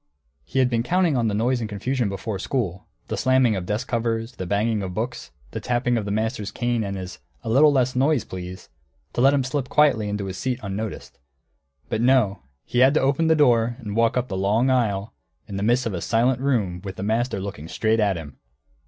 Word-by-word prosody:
He -, -, -6 dB
had 130 Hz, -1 st, +5 dB
been 115 Hz, -2 st, 0 dB
counting 175 Hz, +4 st, +2 dB
on 120 Hz, -2 st, +1 dB
the 105 Hz, -, 0 dB
noise 120 Hz, +4 st, +1 dB
and 110 Hz, -2 st, -4 dB
confusion 115 Hz, +3 st, -1 dB
before 100 Hz, +1 st, -4 dB
school, 100 Hz, -7 st, -3 dB, 0.2 s
the -, -, -2 dB
slamming 130 Hz, -4 st, +3 dB
of 90 Hz, -2 st, -4 dB
desk 105 Hz, +4 st, -2 dB
covers, 115 Hz, 0 st, -1 dB
the 95 Hz, -7 st, -6 dB
banging 105 Hz, +2 st, +1 dB
of 90 Hz, -2 st, -5 dB
books, 120 Hz, +4 st, -4 dB, 0.2 s
the -, -, -4 dB
tapping 120 Hz, 0 st, 0 dB
of 110 Hz, -3 st, -1 dB
the 100 Hz, -, -3 dB
master's 110 Hz, 0 st, -1 dB
cane 120 Hz, -2 st, -1 dB
and 100 Hz, -1 st, -4 dB
his 90 Hz, -2 st, -7 dB, 0.2 s
"A -, -, -4 dB
little 145 Hz, +6 st, +6 dB
less 130 Hz, -2 st, +1 dB
noise, 135 Hz, 0 st, +2 dB
please," 90 Hz, 0 st, -8 dB, 0.5 s
to -, -, 0 dB
let 135 Hz, +2 st, +6 dB
him 140 Hz, -2 st, +2 dB
slip 130 Hz, 0 st, -2 dB
quietly 125 Hz, -9 st, +3 dB
into 105 Hz, -1 st, -3 dB
his 95 Hz, -1 st, -5 dB
seat 130 Hz, -1 st, -2 dB
unnoticed. 100 Hz, +2 st, -5 dB, 0.7 s
But 110 Hz, -, -1 dB
no; 120 Hz, -5 st, +3 dB, 0.2 s
he 120 Hz, -, -1 dB
had 135 Hz, +3 st, +5 dB
to -, -, +5 dB
open 140 Hz, +4 st, +2 dB
the 160 Hz, -, +5 dB
door 120 Hz, -5 st, +3 dB
and 105 Hz, -4 st, -6 dB
walk 115 Hz, +1 st, +2 dB
up 125 Hz, 0 st, 0 dB
the 100 Hz, -, -4 dB
long 110 Hz, +7 st, +2 dB
aisle, 110 Hz, -4 st, 0 dB, 0.3 s
in 100 Hz, -, -5 dB
the -, -, -3 dB
midst 120 Hz, +4 st, +2 dB
of 115 Hz, -, -2 dB
a 85 Hz, -, -3 dB
silent 120 Hz, +5 st, +2 dB
room, 105 Hz, -11 st, 0 dB
with 95 Hz, -2 st, -6 dB
the -, -, -6 dB
master 115 Hz, +1 st, 0 dB
looking 95 Hz, -6 st, -6 dB
straight 110 Hz, +5 st, +1 dB
at 100 Hz, -4 st, +2 dB
him. 75 Hz, -3 st, -10 dB
115 Hz, 225 wpm, -23 LUFS, 100-130 Hz, 0.7 s, little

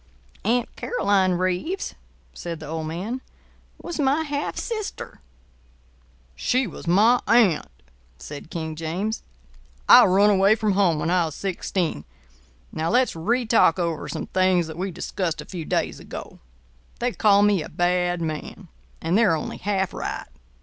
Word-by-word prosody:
"Aunt 235 Hz, +3 st, 0 dB
Caroline 195 Hz, -, +1 dB
Reeves," 185 Hz, -, -2 dB, 0.4 s
said 170 Hz, -2 st, -6 dB
the 155 Hz, -, -8 dB
old 160 Hz, +1 st, -4 dB
man, 200 Hz, +11 st, -4 dB, 0.6 s
"was 345 Hz, -2 st, -6 dB
my 285 Hz, +3 st, +2 dB
half 290 Hz, -1 st, -3 dB
sister." 435 Hz, -3 st, -5 dB, 1.1 s
"She 255 Hz, -, +1 dB
was 180 Hz, -, -9 dB
my 215 Hz, +8 st, +5 dB
aunt," 220 Hz, -9 st, +4 dB, 0.5 s
said 145 Hz, -, -9 dB
King 160 Hz, -2 st, -4 dB
James. 175 Hz, +7 st, -3 dB, 0.7 s
"I -, -, +9 dB
run 200 Hz, +3 st, +4 dB
away 195 Hz, +2 st, +5 dB
from 215 Hz, -2 st, 0 dB
home 190 Hz, -5 st, +3 dB
when 165 Hz, +3 st, -1 dB
I 180 Hz, -2 st, +3 dB
was 155 Hz, -, -6 dB
sixteen. 180 Hz, -, -2 dB, 0.7 s
Now, 160 Hz, +1 st, -2 dB
let's 250 Hz, -2 st, +2 dB
re 235 Hz, +10 st, 0 dB
talk 220 Hz, -7 st, +4 dB
over 170 Hz, -3 st, -2 dB
some -, -, -4 dB
things 185 Hz, -2 st, +2 dB
that 160 Hz, 0 st, -8 dB
we 190 Hz, +2 st, -1 dB
discussed 180 Hz, -1 st, -3 dB
a -, -, -6 dB
few 175 Hz, -4 st, -6 dB
days -, -, -1 dB
ago. -, -, -9 dB, 0.6 s
They 245 Hz, +1 st, -1 dB
call 205 Hz, -3 st, +4 dB
me 205 Hz, -4 st, +3 dB
a -, -, -7 dB
bad 175 Hz, -1 st, 0 dB
man; 160 Hz, +4 st, -6 dB, 0.3 s
and 165 Hz, +3 st, +1 dB
they're 210 Hz, -6 st, +4 dB
only 155 Hz, -, -5 dB
half 195 Hz, -2 st, -1 dB
right. -, -, -4 dB
185 Hz, 150 wpm, -24 LUFS, 165-220 Hz, 1.1 s, I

